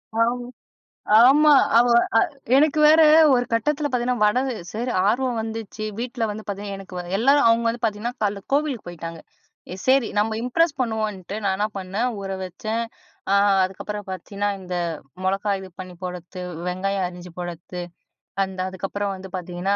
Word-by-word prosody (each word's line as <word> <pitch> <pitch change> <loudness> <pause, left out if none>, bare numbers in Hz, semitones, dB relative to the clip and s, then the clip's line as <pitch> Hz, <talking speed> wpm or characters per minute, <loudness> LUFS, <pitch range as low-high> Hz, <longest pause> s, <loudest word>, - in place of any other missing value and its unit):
ஆம 240 +2 +1 0.8
ஆமா. 300 +4 +6 0.3
அவ 240 +1 +5 0.2
அ - - -3 0.5
எனக்கு 305 +1 +3
வேற, 315 +1 +7 0.3
ஒரு 245 0 +2
கட்டத்துல 290 +6 +1
பாத்தீங்கன்னா, 245 -2 0
வடகு 255 +5 +2 0.2
சரி 240 +3 -3 0.2
ஆர்வம் 245 +1 +1
வந்துச்சு. 220 -1 -6 0.2
வீட்ல 240 -1 -2
வந்து 215 +1 -7
பாத்தீங்கன்னா 200 0 -4
எனக்கு 190 -1 -11 0.2
எல்லாரும் 275 +3 +4
அவுங்க 230 0 +3
வந்து 235 +1 -3
பாத்தீங்கன்னா, 225 +3 -2
காலைல 200 -1 0
கோவிலுக்கு 285 -7 0
போய்ட்டாங்க. 165 -1 -7 0.5
எ - - -8
செரி, 260 -3 +4
நம்ம 220 +1 +1
இம்ப்ரெஸ் 295 +4 +1
பண்ணுவோன்ட்டு 215 -5 -2
நான் 190 -1 +1
என்ன 210 +1 +1
பண்ணன்? 195 +6 -2
ஊற 195 - -5
வச்சன், 220 +5 -3 0.5
ஆ - - +5 0.3
அதுக்கப்புறம் 205 +2 -5
பத்தீங்கன்னா, 200 +3 -3
இந்த 180 -1 -6 0.5
மொளகாய் 195 +1 0
இது 190 - -10
பண்ணி 185 -1 -8
போடுறது 180 0 -6 0.3
வெங்காயம் 190 +1 -1
அறிஞ்சு 180 -1 -11
போடுறது 175 +1 -6 0.6
அந்த 190 -1 -6
அதுக்கப்புறம் 195 +1 -3
வந்து 190 0 -10
பாத்தீங்கன்னா, 180 +2 -2
210 Hz, 150 wpm, -23 LUFS, 190-245 Hz, 0.8 s, வேற